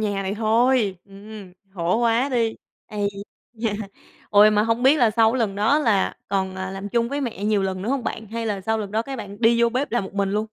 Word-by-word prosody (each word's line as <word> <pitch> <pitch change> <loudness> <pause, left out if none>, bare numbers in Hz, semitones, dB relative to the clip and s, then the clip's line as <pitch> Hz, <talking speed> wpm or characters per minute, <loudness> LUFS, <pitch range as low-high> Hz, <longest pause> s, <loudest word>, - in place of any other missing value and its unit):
nhà 205 -2 -1
này 195 +1 -3
thôi. 225 -2 +2
Ừm, 200 -1 -12 0.2
khổ 175 +2 0
quá 235 +3 +2
đi. 230 -4 0 0.3
Ấy 205 -1 -2 0.4
da. 225 -1 -2 0.6
Ôi 210 +1 +7
mà 210 0 +3
hông 230 +2 0
biết 275 +4 +5
là 235 -3 +4
sau 225 +2 +3
lần 220 -6 0
đó 220 +9 +2
là 220 -9 +1
còn, 190 -1 -1
à, 190 0 -4
làm 195 +1 -6
chung 235 +2 0
với 285 +2 -3
mẹ 220 -7 -4
nhiều 210 -2 +2
lần 190 -1 -3
nữa 215 - -4
hông 265 -2 -1
bạn 220 - -4
hay 230 +2 -4
là 205 -2 -2
sau 220 +3 -1
lần 205 -2 -5
đó 220 +1 0
các 270 +3 -6
bạn 205 +1 -8
đi 235 +1 +4
vô 235 - +5
bếp 255 +4 -2
làm 240 -5 0
một 190 - -10
mình 200 -1 0
luôn? 210 +2 0
215 Hz, 245 wpm, -23 LUFS, 200-235 Hz, 0.6 s, Ôi